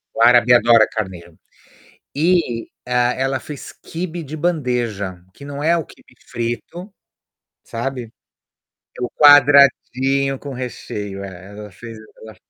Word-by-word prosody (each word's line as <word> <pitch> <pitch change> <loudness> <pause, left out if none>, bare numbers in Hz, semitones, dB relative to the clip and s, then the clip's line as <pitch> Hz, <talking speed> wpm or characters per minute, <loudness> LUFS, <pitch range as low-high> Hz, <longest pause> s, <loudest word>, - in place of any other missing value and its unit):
O - - -2
árabe 120 0 +6
adora 115 -2 +5
carneiro. 90 -6 -7 0.8
E, 155 -7 0 0.2
hã, 125 0 +1
ela 130 0 -1
fez 150 -3 -9
quibe 170 0 -6
de 155 +1 -8
bandeja, 120 - -2
que 140 - -13
não 145 0 -7
é 170 +2 +3
o 165 - -3
quibe - - -20 0.2
frito, 120 - -5 0.7
sabe? 120 -1 -5 0.9
É - - -8
o 120 - -2
quadradinho 140 -2 +4
com 140 -2 -8
recheio, 105 -5 -6
é, 95 -1 -10
ela 105 0 -10
fez, 115 +4 -11 0.2
ela 110 -1 -13
125 Hz, 130 wpm, -19 LUFS, 110-145 Hz, 0.9 s, árabe